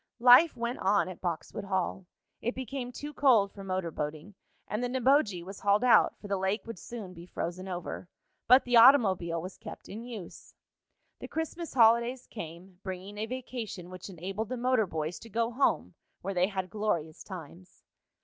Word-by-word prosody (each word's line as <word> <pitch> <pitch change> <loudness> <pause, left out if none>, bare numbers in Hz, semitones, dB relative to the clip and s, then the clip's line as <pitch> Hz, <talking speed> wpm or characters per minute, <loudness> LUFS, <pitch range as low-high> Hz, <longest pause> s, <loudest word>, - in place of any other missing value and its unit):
Life 250 +7 +7
went 235 +2 -3
on 200 +1 +2
at 185 - -9
Boxwood 175 +3 -4
Hall. 190 -1 -2 0.3
It 240 - -2
became 255 0 -5
too 295 +4 -7
cold 235 -9 +4
for 200 - -10
motor 185 -3 -2
boating, 155 +6 -5 0.3
and 215 +3 -2
the - - +1
Neboje 255 - +2
was 195 +1 -8
hauled 205 +3 +3
out, 250 - +5
for 205 - -10
the 200 -1 0
lake 190 +3 -1
would 230 -6 -7
soon 215 -6 -8
be 170 0 -11
frozen 180 +2 -4
over. 180 0 -5 0.4
But 255 +3 +7
the 245 -1 +4
automobile 195 -10 +6
was 185 +3 -8
kept - - -10
in 220 +4 -7
use. 225 -8 -9 0.6
The - - -7
Christmas 320 0 -4
holidays 235 +2 +4
came, 180 -2 -9
bringing 190 +2 -7
a 220 - -2
vacation 235 -7 -6
which 185 +2 -8
enabled 195 +4 -5
the 255 - -3
motor 245 -3 +2
boys 160 0 -3
to 230 - -12
go 230 +2 0
home, 270 +4 +1 0.3
where 195 - -2
they 180 0 +3
had 190 -3 -4
glorious 170 -8 -2
times. 180 -1 -11
205 Hz, 180 wpm, -30 LUFS, 180-240 Hz, 0.6 s, Life